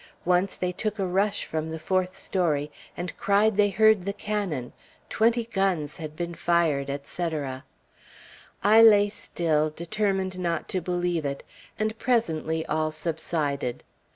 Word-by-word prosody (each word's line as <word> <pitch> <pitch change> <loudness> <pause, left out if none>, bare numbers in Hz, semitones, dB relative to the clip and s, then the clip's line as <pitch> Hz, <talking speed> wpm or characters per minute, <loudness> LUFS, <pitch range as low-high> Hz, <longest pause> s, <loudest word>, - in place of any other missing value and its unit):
Once 180 +2 +2
they 180 0 -1
took 215 +4 -3
a 195 - 0
rush 195 +3 0
from 160 0 -3
the 160 - -4
fourth 185 +2 -1
story, 150 -6 0 0.3
and 180 +1 -5
cried 205 +2 +3
they 205 0 +4
heard 220 -1 +4
the 200 - -2
cannon; 200 - -3 0.4
twenty 230 +1 +2
guns 195 -9 -1
had 155 -1 -7
been 170 +1 -4
fired, 165 -5 +1
etc. 140 -1 -4 1.0
I 215 +3 +7
lay 205 -2 +7
still, 155 -6 0
determined 190 +3 -2
not 170 -2 -2
to 185 - -1
believe 175 -1 -1
it; 140 -1 -3 0.3
and 215 0 -1
presently 160 -9 0
all 155 +1 0
subsided. 155 -4 -2
175 Hz, 140 wpm, -26 LUFS, 155-200 Hz, 1.0 s, I